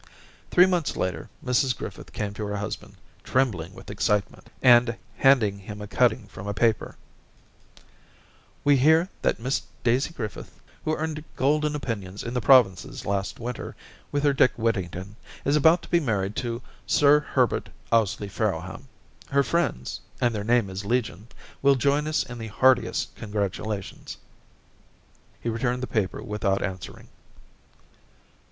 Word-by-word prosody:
Three 180 - +7
months 180 -4 0
later. 90 0 -2 0.2
Mrs 125 0 +2
Griffith - - -8
came 105 -1 -3
to 105 0 -4
her 105 0 -3
husband, 105 +1 -5 0.3
trembling 95 -9 0
with 95 - -10
excitement, 105 -4 -1 0.2
and 120 -2 +6 0.2
handed 130 -7 +5
him 105 +2 -8
a 105 - -6
cutting 120 +1 +2
from 100 0 -9
a 100 - -3
paper,— 115 0 +1 0.8
* - - -31
We 145 -1 +6
hear 160 +7 +4
that - - +1
Miss 130 +4 -1 0.2
Daisy 125 +6 +2
Griffith, 110 -10 -7 0.2
who 155 - 0
earned 155 -1 -3
golden 150 +2 +1
opinions 105 -8 -4
in 120 - -5
the 125 - 0
provinces 110 -8 +4
last 100 0 -2
winter 120 +1 -5 0.4
with 145 0 0
her 145 -1 +4
Dick 130 -2 +4
Whittington, 100 -3 -2 0.3
is 140 - +3
about 160 +3 +5
to - - -12
be 170 - +4
married 105 - -1
to 120 -1 -3 0.2
Sir 145 0 +5
Herbert 130 -5 0 0.2
Ously 105 -2 +2
Farrowham. 100 - -3 0.4
Her 140 0 +3
friends 140 - -1 0.2
y - - +1
and 120 - +2
their 105 -2 -3
name 115 -3 +2
is 95 +2 -5
legion, 110 -2 -1 0.3
will 140 0 +5
join 140 +3 +2
with - - -2
us - - +3
in 120 -1 -9
the 115 - -5
heartiest 125 +2 +2
congratulations' 105 -1 -4 1.2
He - - -6
returned 120 +2 -1
the - - +1
paper 110 -6 -2
without 100 -2 -1
answer 95 -3 -5
ing. - - -19
115 Hz, 155 wpm, -26 LUFS, 100-135 Hz, 1.2 s, Three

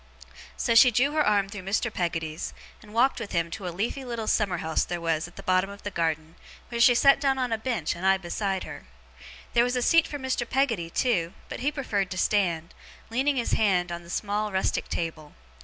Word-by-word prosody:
So, 235 - +1
she 230 +2 +8
drew 255 +5 +2
her 305 0 +2
arm 205 -5 +2
through 200 -1 -7
Mr. 210 +5 -1
Peggotty's, 165 -2 -3 0.3
and 210 - -15
walked 245 +5 +2
with 225 -3 -6
him 170 0 0
to 195 0 -5
a - - -1
leafy 215 +10 -3
little 235 -3 -4
summer 200 -4 +1
house 160 -1 0
there 175 0 -4
was 165 -1 -1
at 175 - -17
the - - -10
bottom 185 +1 +2
of 200 0 -11
the 205 - -4
garden, 160 -2 -2 0.3
where 235 -1 -2
she 245 0 +7
sat 275 +2 +5
down 270 -2 +2
on 250 -2 -1
a 225 - +1
bench, 220 - -2
and 170 - -9
I 190 0 +4
beside 190 +1 -2
her. 65 - -9 0.7
There 235 - +5
was 245 +1 0
a 250 - 0
seat 330 +4 +4
for 290 - -5
Mr. 260 -3 -2
Peggotty 230 -11 0
too, 175 -5 0 0.2
but - - -6
he 275 +4 0
preferred 210 -10 -2
to 185 - -5
stand, 175 -6 0 0.4
leaning 270 +4 +1
his 240 -3 -1
hand 185 -5 +2
on 170 0 -5
the 170 - -15
small 210 +3 -2
rustic 190 0 -1
table. 155 -3 -4
205 Hz, 225 wpm, -26 LUFS, 175-245 Hz, 0.7 s, she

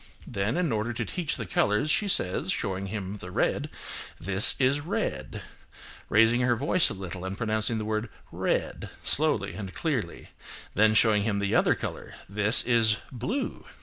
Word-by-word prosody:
Then, 105 +3 -2
in 175 -6 0
order 110 +2 -1
to - - -3
teach 170 -3 -3
the 115 - -5
colours, 105 +9 +1
she 205 - +2
says, 160 - +2
showing 100 - -3
him 100 0 -5
the 90 - -9
red, - - -1 0.5
"This 95 +2 +6
is 135 +2 +2
red," 150 +4 -4 0.7
raising 115 +3 +4
her 125 -1 +2
voice 155 +8 +2
a - - -6
little 95 -1 -7
and 95 +1 -5
pronouncing 110 0 -1
the 110 - -4
word 110 +1 -2 0.2
"red" - - -2
slowly 140 -10 +1
and 95 -3 -7
clearly; 130 - -3 0.4
then 110 +1 +3
showing 105 -1 +4
him 100 -1 -1
the 100 0 -1
other - - +3
colour, - - -7
"This 105 +2 +4
is 115 -3 +3
blue." 165 - -4
110 Hz, 165 wpm, -27 LUFS, 100-125 Hz, 0.7 s, This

